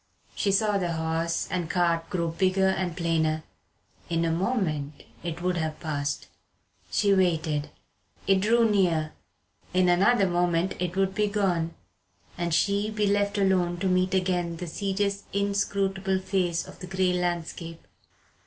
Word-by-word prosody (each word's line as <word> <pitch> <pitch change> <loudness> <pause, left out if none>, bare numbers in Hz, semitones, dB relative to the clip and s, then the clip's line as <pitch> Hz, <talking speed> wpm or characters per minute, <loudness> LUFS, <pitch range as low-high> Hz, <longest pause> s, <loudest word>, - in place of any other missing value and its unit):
She 200 - 0
saw 205 0 +2
the 175 -2 -1
horse 165 +1 -1
and 175 -3 -2
cart 170 -2 +1
grow 170 -3 -1
bigger 190 +3 +2
and 185 -2 -2
plainer. 160 -2 0 0.7
In 165 0 +1
a 165 - +1
moment 165 - -1 0.2
it 175 0 -4
would 180 -1 +1
have 160 -2 -2
passed. 145 -2 -3 0.6
She 200 -1 +3
waited. 160 -5 +1 0.6
It 195 -1 +4
drew 230 +3 +4
near. 170 -7 +1 0.6
In 185 0 +4
another 195 +5 +4
moment 175 0 +1
it 180 0 -2
would 190 0 +1
be 210 +1 +1
gone, 180 -5 0 0.6
and 175 -1 -2
she 200 +5 +2
be 210 -1 0
left 205 +1 +1
alone 185 -3 +2
to 195 - +1
meet 185 +1 +2
again 180 -2 0
the 180 - -5
serious 200 +3 -2
inscrutable 195 -1 0
face 185 -3 -1
of - - -12
the 180 - -7
grey 185 0 +1
landscape. 170 -2 -3
180 Hz, 145 wpm, -27 LUFS, 165-195 Hz, 0.7 s, It